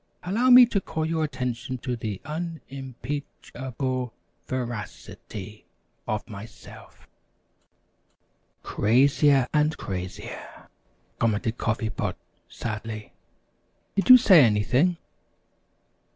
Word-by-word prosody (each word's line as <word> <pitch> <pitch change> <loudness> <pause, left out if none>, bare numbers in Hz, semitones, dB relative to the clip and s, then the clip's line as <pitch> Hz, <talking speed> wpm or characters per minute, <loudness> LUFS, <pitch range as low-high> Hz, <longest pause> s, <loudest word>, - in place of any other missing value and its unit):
"Allow 225 +8 +1
me 250 0 +10
to 210 -4 -1
call 160 -3 -3
your 160 0 0
attention 130 -3 -3
to 125 0 -3
the 105 -4 -5
un 165 +1 -4
im 135 -2 -8
peach 145 +3 -6
able 130 -2 -3 0.3
ver 125 -2 -2
ac 105 -2 -8
i - - -14
ty 105 +1 -8 0.4
of 110 +2 -2
myself." 110 0 -12 1.6
"Crazier 135 +4 +3
and 150 +1 +2
crazier!" 90 -1 -7 0.5
commented 115 +1 0
Coffee 110 0 -1
Pot, - - -3 0.3
sadly. 110 -1 -6 0.8
"Did 200 +5 0
you 255 - +12
say 190 - +7
anything?" 125 - +2
130 Hz, 110 wpm, -25 LUFS, 110-155 Hz, 1.6 s, you